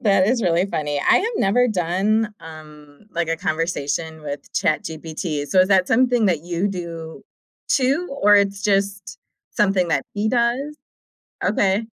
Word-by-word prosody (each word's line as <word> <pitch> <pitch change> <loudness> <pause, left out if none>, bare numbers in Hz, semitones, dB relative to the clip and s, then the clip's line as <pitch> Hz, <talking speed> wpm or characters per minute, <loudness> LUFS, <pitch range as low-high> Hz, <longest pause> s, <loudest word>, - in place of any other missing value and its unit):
That 195 -3 +3
is 235 +1 +1
really 175 +1 +2
funny, 145 -5 -2
I - - +4
have 455 +4 0
never 245 +6 +3
done, 210 +3 0
um, 150 +1 -13
like, 170 -1 -2
a 165 - 0
conversation 160 -1 -2
with 145 -1 -7
ChatGPT, 155 -1 -2
so, 185 +3 +3
is 185 - +3
that 190 -2 +3
something 245 -2 +3
that 165 -5 0
you 175 +3 -1
do 170 -3 -7 0.5
too, 275 +5 +1
or 205 0 +6
it's 200 -1 +2
just 200 -1 -1 0.4
something 195 -3 +1
that - - +1
he 210 +1 -1
does? 250 +5 0 0.7
Okay. 205 +1 +1
190 Hz, 150 wpm, -21 LUFS, 160-215 Hz, 0.7 s, or